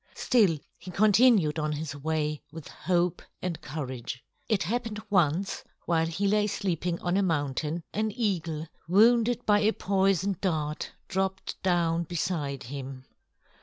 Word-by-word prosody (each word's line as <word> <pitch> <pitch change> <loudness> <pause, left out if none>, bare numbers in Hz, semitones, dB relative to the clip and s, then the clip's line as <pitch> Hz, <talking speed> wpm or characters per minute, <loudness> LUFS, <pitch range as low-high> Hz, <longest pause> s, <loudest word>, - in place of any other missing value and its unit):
Still 205 -10 +3 0.2
he 185 - -10
continued 205 -4 +4
on 150 0 -1
his 150 -1 -4
way 150 0 -1
with 160 -1 -9
hope 175 0 0 0.2
and 180 -3 -4
courage. 130 -4 -5 0.3
It 205 -5 +2
happened 225 +3 -2
once, 180 0 +2 0.2
while 165 -1 +2
he 180 +5 -1
lay 210 +1 +3
sleeping 180 -4 -1
on 175 +1 +1
a - - +3
mountain, 155 -1 -1
an 215 +1 0
eagle 170 -8 -1 0.2
wounded 230 +5 +4
by 205 -1 +5
a 215 +1 +3
poison 195 -1 +1
dart 155 -5 -1 0.2
dropped 190 0 -2
down 170 -2 +1
beside 155 -5 -2
him. 130 0 -7
175 Hz, 135 wpm, -28 LUFS, 155-200 Hz, 0.3 s, by